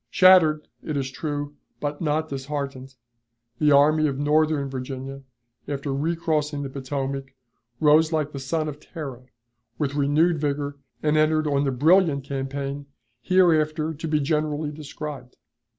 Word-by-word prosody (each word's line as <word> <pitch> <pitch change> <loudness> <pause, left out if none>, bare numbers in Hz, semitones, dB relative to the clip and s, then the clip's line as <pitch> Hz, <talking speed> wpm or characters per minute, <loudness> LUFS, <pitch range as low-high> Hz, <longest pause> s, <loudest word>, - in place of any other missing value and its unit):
Shattered, 170 -5 +5
it 155 -2 -3
is 135 -1 -2
true, 145 0 -4 0.3
but 145 0 -3
not 155 0 0
disheartened, 135 -1 -5 0.6
the 150 -1 +4
Army 155 +2 +5
of 135 -2 -2
Northern 150 0 +2
Virginia 135 +1 -6 0.5
after 140 -1 -3
recrossing 150 -1 -1
the 135 - -5
Potomac 135 0 -4 0.4
rose 155 +1 +5
like 155 -2 0
the 140 - -6
son 155 +4 -1
of 150 -1 -6
Terra, 135 -7 -8 0.5
with 145 -2 -1
renewed 150 +4 +2
vigor, 145 -1 -2 0.2
and 155 0 +2
entered 155 0 +3
on 145 -1 +1
the 135 - +1
brilliant 155 +1 +3
campaign 140 +1 -4 0.3
hereafter 160 -4 +2
to 160 +2 -6
be 155 -1 +1
generally 150 0 -1
described. 150 -3 -8
145 Hz, 135 wpm, -24 LUFS, 140-155 Hz, 0.6 s, Shattered